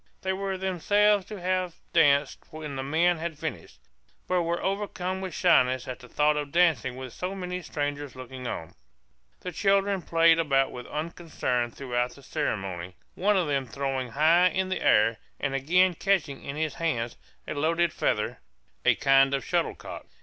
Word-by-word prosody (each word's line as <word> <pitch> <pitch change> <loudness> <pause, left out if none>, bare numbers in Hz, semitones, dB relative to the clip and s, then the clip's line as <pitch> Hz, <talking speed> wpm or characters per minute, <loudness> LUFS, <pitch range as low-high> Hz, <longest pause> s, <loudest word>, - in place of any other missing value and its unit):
They 190 0 0
were 195 0 -3
themselves 200 +2 +2
to 210 -1 -7
have 185 -1 -1 0.2
danced 145 -4 +4
when 155 -3 -7
the 135 - -3
men 165 +5 +2
had 165 -2 -4
finished, - - -6 0.5
but 180 -1 +2
were 170 0 -1
overcome 190 -2 -2
with 185 -4 -5
shyness 130 0 +3
at 130 - -5
the 125 - -14
thought 150 +3 +2
of 145 -1 -3
dancing 160 -8 +2
with 130 -1 -8
so 185 +2 -4
many 180 -1 -4
strangers 145 -3 -4
looking 130 0 -8
on. 80 -8 -5 0.7
The 180 - -5
children 195 +1 +2
played 165 -1 +4
about 135 -4 +2
with 125 -1 -8
unconcern 150 -6 -2
throughout 125 0 -2
the 140 - -16
ceremony, 95 -6 -3 0.2
one 205 +2 +2
of 180 - +2
them 140 -3 -1
throwing 135 0 -3
high 160 +8 +4
in 190 +1 -1
the 185 - -2
air, 110 +1 +4 0.2
and 135 -1 -1
again 180 +7 +3
catching 170 -6 0
in 140 - -5
his 155 -1 -1
hands, 120 -9 -2 0.3
a - - -3
loaded 165 +3 +1
feather, - - -1 0.4
a - - +4
kind 135 0 +4
of 135 - -4
shuttlecock. - - -3
155 Hz, 170 wpm, -27 LUFS, 135-180 Hz, 0.7 s, danced